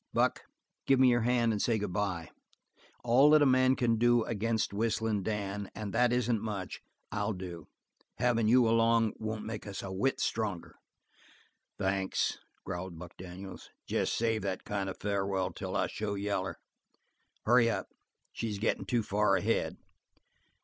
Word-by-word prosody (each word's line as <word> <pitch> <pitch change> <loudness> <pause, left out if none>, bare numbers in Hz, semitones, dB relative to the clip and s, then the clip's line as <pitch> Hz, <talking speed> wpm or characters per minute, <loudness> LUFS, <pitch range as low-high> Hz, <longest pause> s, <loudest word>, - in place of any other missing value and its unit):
Buck, - - +1 0.4
give 135 -1 +5
me 130 -1 +7
your 120 -1 +3
hand 120 0 +2
and 105 -2 -1
say 115 -2 +2
good 100 -4 -3
bye. 90 -5 -2 0.7
All 125 +5 +6
that 155 -1 +6
a - - +5
man 130 0 +4
can 115 -3 +1
do 120 0 +4
against 110 -1 -1
Whistling 110 0 0
Dan, 100 -1 -3
and 105 -3 -5
that 120 +1 +3
isn't 120 -3 +1
much, 100 -4 -5 0.3
I'll 105 +2 -1
do. 90 -4 -7 0.5
Having 120 -3 +2
you 120 +1 +5
along 115 -1 +3
won't 110 0 -4
make 110 -2 -6
us 100 - -5
a 95 - -5
whit 100 +9 0
stronger." 105 -6 -2 1.0
"Thanks," 95 0 0 0.3
growled 90 -1 -5
Buck 85 +1 -10
Daniels. 95 +1 -9 0.2
"Jes - - 0
save 115 -1 0
that 95 -1 -3
kind 100 -2 -2
farewell 100 -2 -1
till - - -5
I - - +2
show 105 -1 -3
yaller. 100 -2 -2 0.9
Hurry 115 0 +5
up, - - -2 0.4
she's 110 -3 -3
gettin' 110 +3 -1
too 120 -3 +1
far 105 +1 +2
ahead." - - 0
110 Hz, 155 wpm, -31 LUFS, 100-115 Hz, 1.0 s, me